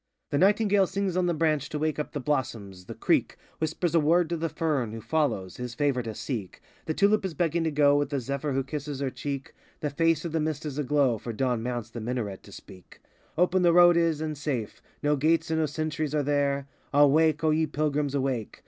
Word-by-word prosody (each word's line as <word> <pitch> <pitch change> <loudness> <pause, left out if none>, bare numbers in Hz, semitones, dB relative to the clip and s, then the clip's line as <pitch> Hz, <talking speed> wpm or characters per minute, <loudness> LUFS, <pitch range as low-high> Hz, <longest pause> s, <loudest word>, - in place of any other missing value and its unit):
The 140 - +1
nightingale 205 0 +4
sings 195 -1 -2
on 180 -1 +1
the 175 - +1
branch 155 -3 0
To 150 - -3
wake 155 0 -1
up 150 - -3
the 145 - -4
blossoms; 110 -10 -3
the - - -8
creek - - +1 0.2
Whispers 160 +1 -1
a 165 - +5
word 165 +2 +3
to 170 - -1
the 165 +1 -2
fern, 140 -10 -1
Who 115 - -6
follows, 115 - -1
his 125 -1 -6
favor 140 -2 +1
to 110 -2 -6
seek; 110 -8 -5 0.3
The 155 - -1
tulip 205 +1 +3
is 185 -4 -4
begging 170 +1 0
to - - +2
go 145 -1 +4
With 145 -2 -1
the 140 -2 -1
zephyr 140 +3 -3
who 135 0 0
kisses 145 0 -5
her 135 -2 -2
cheek; 140 -1 -5 0.2
85 - - -41
The 150 - -1
face 165 +3 +1
of 170 - -3
the 160 - 0
Mist 155 0 -2
is 150 -1 -4
a - - +1
glow, 135 -4 +2
For 120 - -5
Dawn 125 0 0
mounts 120 -2 -4
the 120 - -6
Minaret 110 -4 -3
to 100 - -15
speak: 95 -1 -14 0.4
Open 180 +2 +3
the 175 -1 +5
v 170 - +3
road 175 -1 +7
is, 165 -2 +1
and 155 -1 -3
safe; 135 -7 -4 0.2
No 145 0 +3
gates 160 +3 +1
and 160 - +1
no 155 - +2
sentries 155 0 -3
are 150 - +1
there; 140 -1 0 0.2
Awake, 145 +2 +4
O 155 - +3
ye 160 +1 +2
Pilgrims, 150 -1 -1
aivake! 130 -5 -2
145 Hz, 235 wpm, -27 LUFS, 130-160 Hz, 0.4 s, road